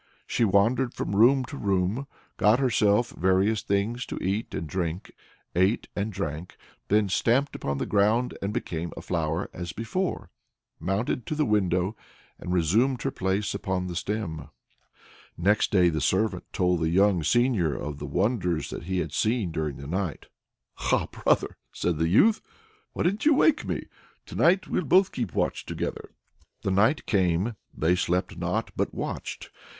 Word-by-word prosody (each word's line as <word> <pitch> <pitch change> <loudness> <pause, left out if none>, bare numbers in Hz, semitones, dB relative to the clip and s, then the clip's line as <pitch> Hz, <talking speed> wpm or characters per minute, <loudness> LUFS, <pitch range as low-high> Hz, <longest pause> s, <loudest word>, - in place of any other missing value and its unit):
She - - 0
wandered 115 +5 +2
from 100 - -3
room 130 +5 +5
to 130 - -8
room, 100 +6 0 0.3
got 105 +3 +4
herself 120 -3 +2
various 95 +4 +2
things 105 +5 -1
to - - -5
eat 100 +4 -2
and - - -3
drink, 85 +1 -3 0.4
ate 95 +6 +2
and 105 +2 -2
drank, 90 -3 -5 0.3
then 105 0 +3
stamped 120 +8 +1
upon 70 0 -2
the - - -2
ground 110 +5 +2
and 100 - -2
became 85 -4 -3
a - - -7
flower 80 +1 -1
as 85 -1 -6
before, 165 - -3 0.5
mounted 105 +5 -2
to 155 - -2
the 150 0 +1
window, 95 -2 +1 0.4
and 90 - -5
resumed 110 - +2
her 135 - 0
place 95 +1 -1
upon 95 -2 -2
the 90 -1 -5
stem. 85 -6 -3 0.9
Next 100 +6 +2
day 90 -3 +4
the 80 -2 -2
servant 105 +8 +1
told 90 -2 +1
the 80 0 +1
young 95 +1 +3
seigneur 110 - +2
of 75 -1 -5
the 75 - -5
wonders 90 - 0
which - - -6
he 95 +1 -2
had 75 -2 -5
seen 110 -4 0
during 80 -3 -3
the 70 - -9
night. 90 +1 -3 0.7
"Ah, - - +2
brother!" - - 0 0.2
said 85 -3 -1
the 80 0 +2
youth, 215 - +4 0.5
"why - - -1
didn't 200 - +1
you 310 - +6
wake 310 +2 +3
me? - - -3 0.4
To - - -11
night 190 +4 +3
we'll - - 0
both 185 +6 +4
keep 115 -10 -4
watch - - 0
together." - - -5 0.5
The 95 - 0
night 110 +10 +3
came; 95 +2 +1 0.2
they 85 +3 +1
slept 90 0 -1
not, - - -2
but - - -2
watched. - - -5
100 Hz, 165 wpm, -26 LUFS, 90-115 Hz, 0.9 s, you